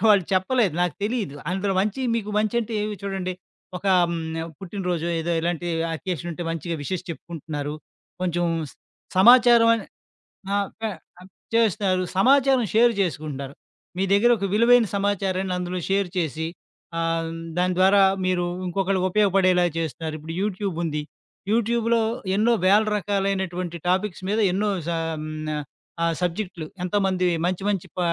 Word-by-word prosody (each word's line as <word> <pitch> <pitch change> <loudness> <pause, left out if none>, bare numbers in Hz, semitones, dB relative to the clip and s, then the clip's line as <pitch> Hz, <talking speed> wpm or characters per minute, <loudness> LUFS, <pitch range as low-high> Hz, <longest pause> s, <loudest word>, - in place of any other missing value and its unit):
నాకు - - -2
వాళ్ళు 200 -4 +5
చెప్పలేదు. 190 - +2
నాకు 175 -4 0
తెలీదు. 215 - -2 0.2
అందులో 195 +1 0
మంచి 210 +5 -1
మీకు 210 -2 -2
మంచంటే, 225 +1 0
ఏవి 210 0 -2
చూడండి, 195 -2 -3 0.5
ఒక - - -23 0.3
హ్మ్. 170 - -2 0.4
పుట్టినరోజో 180 -3 -3
ఏదో 170 +1 -1
ఇలాంటి 175 +1 -2 0.3
అకేషన్ 175 -1 -4
ఉంటే 175 +2 -6
మంచిగా 165 +1 -3
విషెస్ 185 +4 -3
చెప్పుకుంటున్నారు, 150 -3 -5 0.5
కొంచెం 175 -1 0 0.7
సమాచారం 240 +2 +7
అని 225 - -4 0.7
ఆ - - +2 0.3
కా 225 - 0 0.7
చేస్తారు 200 -4 +2 0.2
సమాచారం 265 +3 +4
షేర్ 235 +2 +5
జేసుకుంటున్నారు. 145 -6 -3 0.4
మీ 190 - +1
దెగ్గర 225 +5 +5
ఒక 200 - -2
విలువైన 235 +1 +5
సమాచారాన్ని 195 -2 0
అందులో 180 0 -3
షేర్ 195 0 +2
చేసి, 160 -1 -1 0.5
ఆహ్, 165 0 0 0.3
దాని 180 0 +2
ద్వారా 195 +2 +6 0.2
మీరు 180 -1 +1 0.2
ఇంకొకళ్ళకి 190 +1 0
ఉపయోగపడేలా 185 -3 +3
జేస్తున్నారు. 160 -1 -3
ఇప్పుడు 160 +2 -7
యూట్యూబ్ 200 -3 -2
ఉంది, 150 -2 -2 0.5
యూట్యూబ్‌లో 230 +1 +2 0.3
ఎన్నో 230 +3 +3
వేల 205 +3 +6
రకాలైనటువంటి 190 -3 -1
టాపిక్స్ 185 0 0
మీద 215 +2 +1
ఎన్నో 210 +2 +1 0.2
స - - -1 1.1
ఆహ్, 165 -1 +1
సబ్జెక్టులు 180 -2 -3 0.2
ఎంతోమంది 190 -1 +1 0.2
మంచి 185 +1 -1
మంచి 195 -4 -1
ప - - -2
190 Hz, 130 wpm, -24 LUFS, 175-210 Hz, 1.1 s, సమాచారం